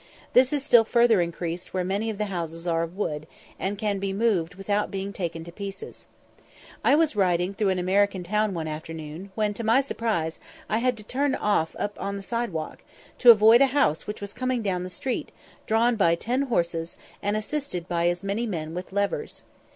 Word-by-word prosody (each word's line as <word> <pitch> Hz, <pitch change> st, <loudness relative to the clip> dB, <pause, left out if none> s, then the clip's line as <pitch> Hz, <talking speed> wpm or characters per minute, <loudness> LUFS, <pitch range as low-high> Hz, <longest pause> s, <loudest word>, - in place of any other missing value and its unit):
This 255 Hz, +1 st, +5 dB
is 290 Hz, -2 st, 0 dB
still 235 Hz, -2 st, +7 dB
further 235 Hz, -3 st, +4 dB
increased 170 Hz, +1 st, -4 dB
where 185 Hz, -, +1 dB
many 200 Hz, +5 st, -1 dB
of 215 Hz, -, -4 dB
the 210 Hz, -, -1 dB
houses 165 Hz, -3 st, -5 dB
are 165 Hz, -1 st, +1 dB
of 165 Hz, +3 st, -5 dB
wood, 155 Hz, -6 st, -3 dB, 0.3 s
and 200 Hz, +2 st, -2 dB
can 205 Hz, -2 st, -1 dB
be 195 Hz, 0 st, -2 dB
moved 195 Hz, -5 st, +1 dB
without 205 Hz, +2 st, -1 dB
being 195 Hz, +1 st, -4 dB
taken 170 Hz, -4 st, -4 dB
to 170 Hz, -, -10 dB
pieces. 195 Hz, +1 st, -8 dB, 0.8 s
I -, -, +5 dB
was 310 Hz, -4 st, +2 dB
riding 180 Hz, -1 st, +2 dB
through 200 Hz, 0 st, +1 dB
an 190 Hz, -, +1 dB
American 190 Hz, +1 st, +1 dB
town 210 Hz, +2 st, 0 dB
one 160 Hz, -2 st, -3 dB
afternoon, 160 Hz, +3 st, -7 dB
when, 210 Hz, -1 st, 0 dB
to 230 Hz, -, -5 dB
my 225 Hz, +4 st, +4 dB
surprise, 220 Hz, -11 st, -2 dB, 0.3 s
I 220 Hz, -, +1 dB
had 250 Hz, 0 st, +1 dB
to 215 Hz, -, -10 dB
turn 270 Hz, +5 st, 0 dB
off 205 Hz, -6 st, 0 dB
upon 200 Hz, -1 st, -3 dB
the 200 Hz, -, -6 dB
side 235 Hz, +1 st, -2 dB
walk, 160 Hz, -2 st, -5 dB, 0.4 s
to 245 Hz, -, +7 dB
avoid 225 Hz, +2 st, +8 dB
a 275 Hz, -, +7 dB
house 160 Hz, -, +2 dB
which 210 Hz, 0 st, -5 dB
was 200 Hz, 0 st, -6 dB
coming 255 Hz, -1 st, -1 dB
down 185 Hz, -3 st, -1 dB
the 180 Hz, -, -5 dB
street, 245 Hz, +8 st, -3 dB, 0.4 s
drawn 230 Hz, +2 st, +3 dB
by 170 Hz, -5 st, +4 dB
ten 245 Hz, +9 st, -1 dB
horses, 170 Hz, -5 st, -1 dB, 0.3 s
and 205 Hz, +1 st, 0 dB
assisted 215 Hz, -, -4 dB
by 170 Hz, -1 st, +1 dB
as 175 Hz, +1 st, -1 dB
many 205 Hz, +4 st, -1 dB
men 160 Hz, -5 st, -4 dB
with 180 Hz, +2 st, -6 dB
levers. 200 Hz, -, -2 dB
200 Hz, 200 wpm, -26 LUFS, 175-225 Hz, 0.8 s, avoid